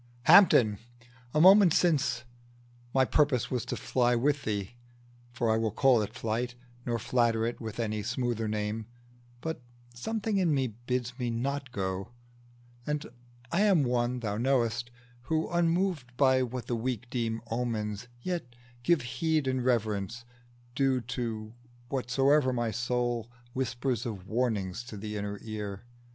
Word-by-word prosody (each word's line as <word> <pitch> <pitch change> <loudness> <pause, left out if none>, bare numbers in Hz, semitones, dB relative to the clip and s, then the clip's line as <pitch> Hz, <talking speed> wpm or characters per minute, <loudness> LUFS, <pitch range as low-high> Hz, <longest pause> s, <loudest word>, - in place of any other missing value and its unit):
"Hampden! 120 - +7 0.5
a 150 - +1
moment 190 0 +8
since, 135 -9 +2 0.7
my 130 +1 +4
purpose 140 -3 +2
was 125 -3 0
To - - -3
fly 125 -1 +2
with 140 +4 +1
thee, 105 0 -2 0.6
for 120 -1 -1
I 110 - +3
will 110 0 +1
call 125 +2 +4
it 105 - -5
flight, 120 +3 -2 0.3
Nor 120 -1 +1
flatter 115 -1 +1
it 120 +1 -3
with 110 0 -6
any 110 -2 -1
smoother 120 0 -1
name, 105 +1 -2 0.5
But 160 -5 -4 0.3
something 215 - -2
in 175 -6 +3
me 135 -1 +1
bids 125 +2 -4
me 120 -1 -1
not 135 +4 -2
to - - -25
go; 95 0 -3 0.8
And 150 0 -1 0.5
I 180 - +2
am 195 -8 +4
one, 125 0 0
thou 105 -3 -2
knowest, 120 -1 +1 0.4
who, 160 +3 0
unmoved 170 -7 0
By 130 -2 +4
what 125 -1 -3
the 120 - -1
weak 125 0 -3
deem 115 -2 -1
omens, 115 -2 -2 0.2
yet 170 -10 -3 0.3
give 150 +2 +2
heed 145 +5 0
And 130 -1 0
reverence 110 -2 0 0.5
due 135 0 +2
to 115 -3 -4 0.4
whatsoe'er 135 +1 +2
my 120 -2 -1
soul 120 -1 -1 0.2
Whispers 125 -2 -1
of 100 -5 -6
warning 110 -5 0
to 110 - -7
the 105 +1 -5
inner 100 0 -3
ear. 105 -1 -5
120 Hz, 145 wpm, -29 LUFS, 110-135 Hz, 0.8 s, moment